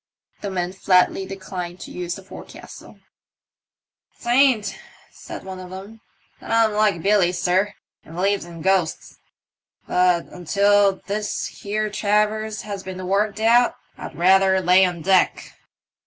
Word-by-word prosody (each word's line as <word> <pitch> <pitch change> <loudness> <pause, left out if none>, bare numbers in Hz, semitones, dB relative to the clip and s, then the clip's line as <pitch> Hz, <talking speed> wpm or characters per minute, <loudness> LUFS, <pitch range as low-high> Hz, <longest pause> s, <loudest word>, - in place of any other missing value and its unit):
The 200 - -4
men 180 -1 -3
flatly 190 0 +2
declined 185 -2 -7
to - - -9
use 175 -1 -4
the 195 - -11
forecastle, - - -12 1.2
"'Tain't," 240 -4 +3 0.4
said - - -10
one 190 -1 -8
of 185 -1 -9
them, 200 +4 -10 0.4
"that - - -12
I*m 225 -1 +3
like 210 -6 +1
BUly, 200 -3 +3
sir, 185 +3 0 0.3
and 160 - -13
believes 195 +3 0
in 170 -2 -10
ghosts. 190 -4 -1 0.7
But 180 -1 +2
until 200 +3 +2
this 210 +1 -3
here 215 +1 -4
traverse 210 +1 0
has 200 -2 -6
been 185 -1 -7
worked 205 +2 0
out 235 +2 +4 0.2
I'd - - -9
rather 190 +2 +4
lay 185 +1 +5
on 175 -3 -4
deck. 190 +1 +1
195 Hz, 135 wpm, -22 LUFS, 180-210 Hz, 1.2 s, lay